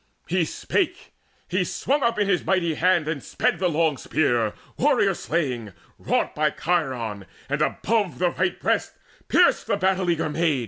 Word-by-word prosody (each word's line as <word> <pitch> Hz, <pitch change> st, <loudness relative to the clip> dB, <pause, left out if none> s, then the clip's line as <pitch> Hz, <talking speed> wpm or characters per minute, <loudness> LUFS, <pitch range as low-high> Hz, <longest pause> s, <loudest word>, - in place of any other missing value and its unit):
He -, -, +1 dB
spake; 360 Hz, 0 st, -2 dB, 0.4 s
he -, -, 0 dB
swung 285 Hz, +2 st, -1 dB
up 235 Hz, -2 st, +1 dB
in 205 Hz, -1 st, +1 dB
his 190 Hz, -3 st, +1 dB
mighty 180 Hz, -4 st, +1 dB
hand 175 Hz, -1 st, +2 dB
And 155 Hz, -3 st, -2 dB
sped 170 Hz, -, -1 dB
the 180 Hz, -1 st, +2 dB
long 160 Hz, -3 st, +1 dB
spear 120 Hz, -6 st, +1 dB, 0.2 s
warrior -, -, +3 dB
slaying, 125 Hz, -, -2 dB, 0.3 s
wrought -, -, 0 dB
By 150 Hz, 0 st, +2 dB
Chiron, 130 Hz, -, -2 dB, 0.2 s
and 145 Hz, +2 st, -2 dB
above 200 Hz, -, 0 dB
the 180 Hz, +3 st, +1 dB
right 365 Hz, -, -1 dB
breast -, -, 0 dB, 0.3 s
pierced -, -, +3 dB
The -, -, +1 dB
battle 190 Hz, -1 st, +1 dB
eager 165 Hz, -2 st, +1 dB
maid. 155 Hz, -2 st, +1 dB
165 Hz, 165 wpm, -24 LUFS, 140-185 Hz, 0.4 s, warrior